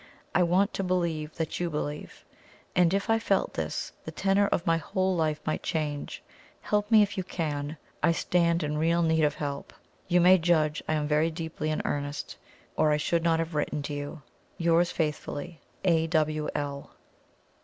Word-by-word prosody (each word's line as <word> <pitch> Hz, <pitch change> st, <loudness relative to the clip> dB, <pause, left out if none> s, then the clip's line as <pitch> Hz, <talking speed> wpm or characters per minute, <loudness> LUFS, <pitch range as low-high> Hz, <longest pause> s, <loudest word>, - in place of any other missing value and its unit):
I -, -, +3 dB
want 185 Hz, +4 st, +3 dB
to 195 Hz, -, -2 dB
believe 170 Hz, -4 st, -1 dB
that 160 Hz, -2 st, -3 dB
YOU 175 Hz, -1 st, 0 dB
believe 150 Hz, -1 st, -5 dB, 0.5 s
and 180 Hz, -2 st, +4 dB
if 195 Hz, +1 st, 0 dB
I 225 Hz, 0 st, +3 dB
felt 200 Hz, -3 st, 0 dB
this, 80 Hz, -1 st, -3 dB
the -, -, -6 dB
tenor 195 Hz, +5 st, +2 dB
of 175 Hz, -, -1 dB
my 165 Hz, 0 st, +3 dB
whole 185 Hz, +3 st, 0 dB
life 155 Hz, -2 st, 0 dB
might 155 Hz, -, -1 dB
change. 150 Hz, -3 st, -3 dB, 0.4 s
Help 210 Hz, 0 st, 0 dB
me 220 Hz, -2 st, +7 dB
if 200 Hz, -1 st, -3 dB
you -, -, -1 dB
can 150 Hz, -4 st, -3 dB, 0.2 s
I 170 Hz, -, +4 dB
stand 170 Hz, 0 st, +1 dB
in 150 Hz, 0 st, -1 dB
real 170 Hz, +2 st, +2 dB
need 160 Hz, -1 st, +2 dB
of 150 Hz, -1 st, +2 dB
help. 140 Hz, -1 st, -5 dB, 0.3 s
You 180 Hz, -1 st, +4 dB
may 180 Hz, +1 st, +7 dB
judge 155 Hz, -3 st, +2 dB
I -, -, +1 dB
am 150 Hz, -1 st, -1 dB
very 155 Hz, +2 st, +2 dB
deeply 160 Hz, -1 st, -4 dB
in 155 Hz, -, -1 dB
earnest, 145 Hz, 0 st, -3 dB, 0.4 s
or 155 Hz, -, +3 dB
I 150 Hz, -, +3 dB
should 165 Hz, +2 st, +1 dB
not 165 Hz, -1 st, +3 dB
have 165 Hz, 0 st, -2 dB
written 150 Hz, -1 st, -1 dB
to 145 Hz, -, -4 dB
you. 145 Hz, +1 st, -6 dB, 0.3 s
"Yours 170 Hz, +1 st, +3 dB
faithfully, 155 Hz, +1 st, -3 dB, 0.2 s
"A. 165 Hz, -3 st, +3 dB
W. 155 Hz, -1 st, 0 dB
L." 140 Hz, -1 st, -4 dB
160 Hz, 185 wpm, -28 LUFS, 150-175 Hz, 0.5 s, me